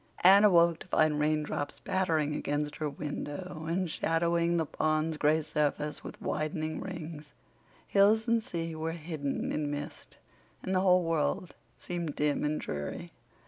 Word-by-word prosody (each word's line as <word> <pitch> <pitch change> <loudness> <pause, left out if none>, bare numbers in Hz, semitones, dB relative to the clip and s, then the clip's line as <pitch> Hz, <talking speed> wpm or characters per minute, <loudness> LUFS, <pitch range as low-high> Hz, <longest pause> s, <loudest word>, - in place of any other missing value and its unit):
Anne 195 +3 +8
awoke 170 -4 +5
to - - -11
find 155 -4 +2
raindrops 150 -1 -1
pattering 160 -6 0
against 145 0 -2
her 155 -1 -2
window 155 +3 -5
and 175 0 -1
shadowing 170 +1 +1
the 165 - +1
pond's 155 +1 0
gray 155 +1 +2
surface 150 0 -1
with - - -9
widening 155 0 -2
rings; 160 -6 -7 0.5
hills 215 +3 +4
and 230 -1 +2
sea 165 -3 -4
were 160 +1 -3
hidden 155 -4 -3
in 150 -1 -1
mist, 145 0 -7 0.5
and 190 - -2
the 185 - +3
whole 180 -1 +4
world 165 +1 -1 0.2
seemed 170 -4 -4
dim 150 -1 +1
and 150 +1 0
dreary. 75 0 -5
160 Hz, 145 wpm, -30 LUFS, 150-175 Hz, 0.5 s, Anne